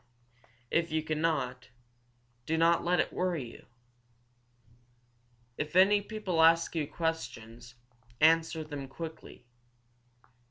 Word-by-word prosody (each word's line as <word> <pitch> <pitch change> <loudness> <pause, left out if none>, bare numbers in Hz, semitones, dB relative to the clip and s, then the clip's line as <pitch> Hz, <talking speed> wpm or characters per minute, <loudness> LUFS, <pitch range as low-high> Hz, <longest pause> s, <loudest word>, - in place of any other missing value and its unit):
If 170 -1 +1
you 155 0 0
cannot, 150 -6 -2 0.8
do 160 - 0
not 165 +1 +3
let 175 +1 +1
it - - 0
worry 170 -10 -2
you! - - -15 1.9
If 150 +2 -4
any 200 +2 +6
people 200 -5 -2
ask 165 +1 +4
you 155 -4 -1
questions, 120 -8 -5 0.4
answer 160 0 +3
them 145 -3 -7
quickly. 160 -3 -9
160 Hz, 105 wpm, -30 LUFS, 145-170 Hz, 1.9 s, any